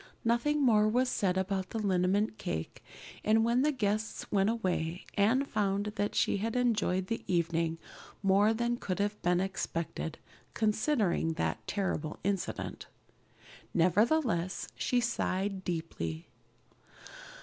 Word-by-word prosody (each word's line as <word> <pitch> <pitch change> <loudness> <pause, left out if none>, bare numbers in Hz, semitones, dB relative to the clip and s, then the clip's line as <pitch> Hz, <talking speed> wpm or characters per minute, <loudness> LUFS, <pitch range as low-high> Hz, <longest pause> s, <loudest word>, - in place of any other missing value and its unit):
Nothing 280 +6 +2
more 215 -4 +5
was 250 +3 +2
said 190 -6 +1
about 190 0 -1
the - - -4
liniment 200 +1 +1
cake, 80 0 -4 0.4
and 220 +1 +4
when 235 +2 +3
the 300 +2 +3
guests 215 -4 -2
went 195 0 +3
away 180 -6 -1
Anne 225 +7 +3
found 205 -3 -1
that 205 +1 -1
she - - +2
had 225 +4 -2
enjoyed 220 -7 +1
the 230 +4 -3
evening 165 -1 +1 0.5
more 200 +2 +4
than 235 +1 0
could 185 -5 -3
have 205 +1 -1
been 175 0 +2
expected, 170 -4 -3 0.4
considering 215 - +1
that - - -2
terrible 180 -6 -2
incident. 195 -1 -3 0.9
Nevertheless, 185 - +2
she 250 - +1
sighed 195 -4 -1
deeply. 85 - -4
200 Hz, 125 wpm, -31 LUFS, 180-225 Hz, 0.9 s, more